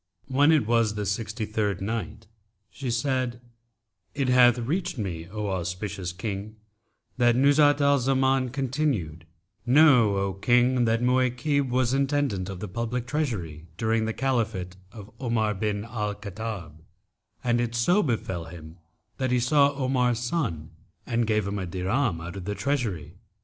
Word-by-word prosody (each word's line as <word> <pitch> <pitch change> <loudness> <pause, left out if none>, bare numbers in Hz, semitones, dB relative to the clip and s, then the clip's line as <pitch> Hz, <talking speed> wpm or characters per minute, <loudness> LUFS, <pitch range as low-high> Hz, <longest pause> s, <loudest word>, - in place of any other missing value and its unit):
When 140 +4 +3
it 150 -8 +3
was 115 -2 +2
the 105 -1 -3
Sixty 110 +2 -2
third 105 -3 -1
Night, 110 +1 -4 0.5
She 130 +4 -5
said, 120 0 -1 0.8
It 135 -3 0
hath 125 -1 +6
reached 165 +8 -2
me, 85 -6 -4
O 105 0 -3
auspicious 90 +1 -3
King, 100 +3 -5 0.6
that 120 -1 +4
Nuzhat 145 +2 +4
al 140 0 +4
Zaman 130 0 +2
continued, 125 - -2 0.4
"Know, 125 -6 +5
O 100 0 -1
King, 120 +4 +3
that 115 +1 +1
Mu'aykib 130 +2 +1
was 125 0 +1
intendant 135 -9 0
of 95 -2 -7
the 105 - -4
public 115 +4 -3
treasury 100 - -3
during 110 +2 +1
the 110 - -1
Caliphate 110 -9 -1 0.2
of 105 -2 -11
Omar 115 -4 0
bin 105 +1 -2
al 105 -3 -3
Khattab; 100 -7 -7 0.6
and 120 -1 +2
it 120 0 -2
so 175 - +3
befel 95 - -2
him 80 0 -11 0.4
that 130 -1 -1
he 125 0 +2
saw 140 +3 +4
Omar's 130 -3 +1
son 120 - -2 0.3
and 115 -1 0
gave 105 -2 +1
him 100 0 -3
a 95 - -4
dirham 95 +3 -1
out 85 +3 -7
of 95 -3 -7
the 105 - -3
treasury. 115 - -2
115 Hz, 150 wpm, -26 LUFS, 100-130 Hz, 0.8 s, hath